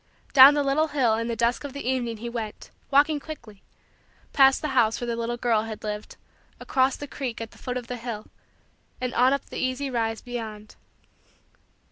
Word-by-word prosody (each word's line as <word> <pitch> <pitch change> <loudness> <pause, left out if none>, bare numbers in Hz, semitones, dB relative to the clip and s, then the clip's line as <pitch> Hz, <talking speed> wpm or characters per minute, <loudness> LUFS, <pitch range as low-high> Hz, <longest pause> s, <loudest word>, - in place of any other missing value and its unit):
Down 275 +2 +10
the 290 - +2
little 285 +3 +2
hill 260 -7 +2
in 230 +1 -1
the 235 - -2
dusk 235 +4 0
of 285 -2 -6
the 280 -3 -6
evening 245 -3 -1
he 235 +3 -6
went, 230 -3 -6 0.2
walking 290 +2 +4
quickly; 230 -10 -10 0.7
past 270 +1 +5
the 305 - -1
house 230 -4 +2
where 245 - -3
the 235 - -1
little 235 +1 -3
girl 235 -3 +2
had 220 -1 -7
lived; 210 0 -5 0.4
across 260 -1 +1
the 290 - -7
creek 270 -4 -5
at 225 -1 -6
the - - -17
foot 250 0 -4
of 245 - -5
the 245 +1 -5
hill; 230 -3 -6 0.7
and 250 -1 -3
on 255 +2 +4
up 280 -1 -1
the - - -7
easy 260 +2 -2
rise 225 -2 -1
beyond. 220 -4 -7
245 Hz, 195 wpm, -25 LUFS, 225-270 Hz, 0.7 s, Down